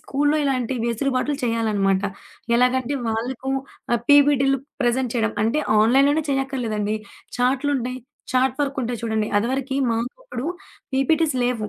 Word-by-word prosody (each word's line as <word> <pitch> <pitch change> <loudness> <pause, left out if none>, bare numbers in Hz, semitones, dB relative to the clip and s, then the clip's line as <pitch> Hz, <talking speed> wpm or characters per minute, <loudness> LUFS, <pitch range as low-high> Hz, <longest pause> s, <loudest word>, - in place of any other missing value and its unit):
స్కూలులో 290 +2 +1
ఇలాంటి 260 -2 0
వెసులుబాట్లు 255 +4 0
చేయాలనమాట. 210 -5 +1 0.5
ఎలాగంటే 255 +2 +2
వాళ్ళకు 240 +4 -3 0.4
ఆహ్, 240 - +2
పీపీటీలు 275 -2 +5 0.2
ప్రెజెంట్ 245 0 +1
చేయడం. 220 -2 0
అంటే 230 +7 +1 0.2
ఆన్‌లైన్‌లోనే 275 +7 +4
చేయక్కర్లేదండి. 240 -6 -1 0.4
చార్టులుంటాయి, 255 0 0 0.3
చాట్ 260 0 +2
వర్కుంటాయి 255 -4 -2
చూడండి. 220 -1 0
అదివరకి 265 +4 -1
మాకప్పుడు 245 - -4 0.5
పీపీటీస్ 295 +2 +2
లేవు. 230 -4 -1
255 Hz, 110 wpm, -22 LUFS, 230-275 Hz, 0.5 s, పీపీటీలు